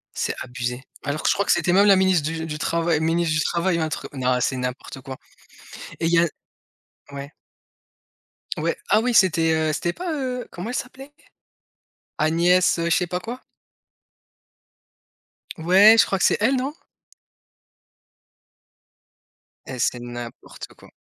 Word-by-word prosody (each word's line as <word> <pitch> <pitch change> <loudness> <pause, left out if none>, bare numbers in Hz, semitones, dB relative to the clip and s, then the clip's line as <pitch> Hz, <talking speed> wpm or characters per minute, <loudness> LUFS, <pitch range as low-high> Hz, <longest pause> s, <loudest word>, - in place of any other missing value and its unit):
C'est - - -2
abusé. 125 0 -4 0.2
Alors 145 +2 -3
que - - +2
je - - +4
crois 200 - -1
que - - +2
c'était 175 - +2
même 200 +2 +5
la 200 - +7
ministre 185 -5 +2
du 160 0 -4
du 150 -1 -5
travail 165 0 0
ministre 165 0 0
du 155 - +1
travail, 170 +2 0
un 160 -1 -1
truc - - -6
non, 130 -2 0
c'est 130 +1 0
n'importe 125 +1 -5
quoi. 130 0 -8 0.8
Et - - -1
il 165 - +1
y 170 - +5
a 170 - +3 0.9
ouais. 140 +1 -7 1.3
Ouais, - - -1
ah - - +5
oui 245 +1 0
c'était, 165 -5 +4
heu? 155 -1 0
C'était 175 +2 -2
pas, 360 -1 -5
heu? 255 -5 -4
Comment 180 +6 -6
elle 250 - -4
s'appelait? 270 +2 -7 1.1
Agnès, 170 +4 +3
heu, 170 - -1
je - - +4
sais 180 - 0
pas 180 +1 -3
quoi. 240 +6 -7 2.2
Ouais, 190 +7 +6
je 200 - +6
crois 195 - -1
que - - 0
c'est - - +3
elle, 250 +5 +3
non? 265 +3 -2 2.9
Eh, 130 - -7
c'est 120 - 0
n'importe 120 0 -9
quoi. - - -18
170 Hz, 160 wpm, -22 LUFS, 150-195 Hz, 2.9 s, la